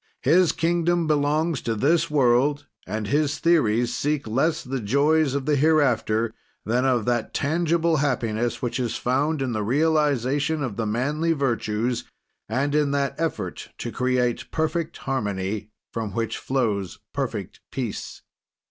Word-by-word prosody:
His 170 +3 +5
kingdom 170 +1 +1
belongs 150 0 +1
to 115 -1 -1
this 160 +8 +2
world, 140 +1 +3 0.2
and 110 0 -3
his 145 +4 +1
theories 120 -9 +2
seek 145 +3 -1
less 135 +9 +1
the 135 +1 -3
joys 140 +6 +2
of 140 -2 -2
the 150 0 +2
hereafter 130 -7 +2 0.3
than 125 +4 +1
of 125 -4 +2
that 120 -2 -1
tangible 165 +2 +1
happiness 120 -5 -1
which 120 +1 -1
is 120 -2 -1
found 140 +4 0
in 130 - -2
the 110 -2 -1
realization 145 +2 +1
of 120 -7 -3
the 115 0 -2
manly 145 +9 0
virtues 120 -4 -1 0.5
and 135 +5 0
in 150 -1 +2
that 140 -1 0
effort 165 -1 -3
to - - -5
create 125 -1 0
perfect 160 +1 -1
harmony 105 -5 -3 0.2
from 110 -4 -3
which 115 -1 -2
flows 105 -8 -1 0.2
perfect - - -4
peace. - - -5
135 Hz, 140 wpm, -24 LUFS, 115-155 Hz, 0.5 s, His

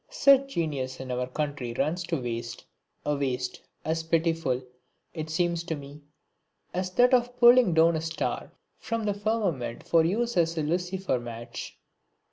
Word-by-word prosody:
Such 275 - +4
genius 135 -6 -2
in 130 -1 -5
our 125 0 -1
country 140 -3 -3
runs 170 +8 0
to 165 -3 -1
waste, 120 -1 -5 0.4
a 150 - +1
waste, 130 -2 -2 0.2
as 160 +1 0
pitiful, 160 -5 0 0.5
it 155 -2 -5
seems 170 +1 0
to 165 - -2
me, 145 +1 -10 0.7
as 185 +1 -1
that 250 +4 +5
of 245 0 +2
pulling 240 -7 +7
down 165 +1 +5
a 160 - -1
star 160 0 -3 0.3
from 230 -1 -3
the 205 -1 +1
firmament 200 - -1
for 165 -1 +5
use 230 +6 0
as 165 -1 +2
a 155 - 0
lucifer 180 -1 -1
match. 120 -1 -7
165 Hz, 155 wpm, -27 LUFS, 135-190 Hz, 0.7 s, pulling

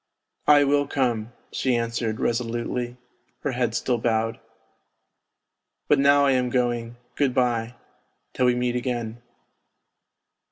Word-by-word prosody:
" - - -45
I 145 - +5
will 145 0 +2
come," 120 -5 -1 0.2
she 130 -2 0
answered 115 -1 -2
resolutely, 120 +1 -2 0.4
her 145 - -1
head 120 -3 -1
still 120 -1 0
bowed. 115 0 0 0.7
" - - -57
But - - +5
now 140 +1 +5
I 140 - +4
am 125 -1 +1
going, 120 -2 -1 0.2
good 135 -4 0
bye... 120 -1 0 0.6
till 125 - +2
we 125 - +3
meet 125 0 0
again." 120 -2 -3
120 Hz, 130 wpm, -24 LUFS, 115-130 Hz, 0.7 s, I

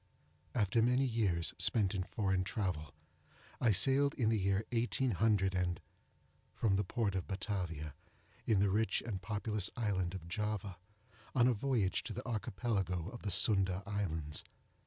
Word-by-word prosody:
After 110 0 +2
many 125 +3 +3
years 100 -9 0
spent 105 -4 +2
in 95 - -1
foreign 95 0 0
travel, 90 - -3 0.6
I 120 - +3
sailed 135 +8 +3
in 115 -4 +2
the 110 -1 +2
year 100 +2 +1
18—, 105 -7 +1 0.8
from 105 -4 +2
the 100 - +2
port 105 +1 -1
of 95 -2 -2
Batavia, 90 -7 -3 0.5
in 105 -4 +4
the 100 -1 +3
rich 110 +3 +1
and 100 -5 -4
populous 105 0 -1
island 95 -5 0
of 85 -3 -7
Java, 100 0 -3 0.6
on 120 -2 +5
a 125 - +4
voyage 115 -4 0
to - - -4
the - - -6
Archipelago 100 -6 -1
of 120 +1 -9
the 105 - -3
Sunda 95 -1 +3
islands. 80 -8 -2
100 Hz, 145 wpm, -35 LUFS, 95-115 Hz, 0.8 s, on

